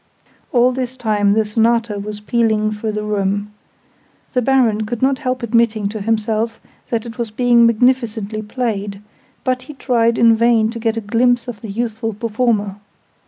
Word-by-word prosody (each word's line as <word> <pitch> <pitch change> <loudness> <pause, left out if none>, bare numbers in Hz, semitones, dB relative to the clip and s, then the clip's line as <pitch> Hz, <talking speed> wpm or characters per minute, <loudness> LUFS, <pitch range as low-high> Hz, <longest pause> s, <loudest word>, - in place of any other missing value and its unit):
All 250 0 +4
this 255 0 -4
time 210 -4 +1
the 220 0 +2
Sonata 225 0 +1
was 210 +1 -6
pealing 215 -1 +1
through 215 0 -3
the 210 0 -3
room. 205 0 -1 0.8
The 250 - +2
Baron 230 -5 +2
could 240 +1 -4
not 270 0 +2
help 255 -2 -2
admitting 230 -3 +1
to 215 0 -6
himself 225 +1 -1 0.3
that 230 -1 -1
it 235 +1 -9
was 235 -2 -2
being 235 +1 +4
magnificently 230 -3 +1
played: 210 -3 -3 0.4
but 255 -1 0
he 300 - -11
tried 235 -3 +1
in 230 -1 +5
vain 225 -1 +3
to 230 - -6
get 225 0 -1
a - - -1
glimpse 245 +4 +1
of 235 -4 -7
the 220 - -7
youthful 225 +1 -3
performer. 215 -3 -1
225 Hz, 165 wpm, -18 LUFS, 210-240 Hz, 0.8 s, in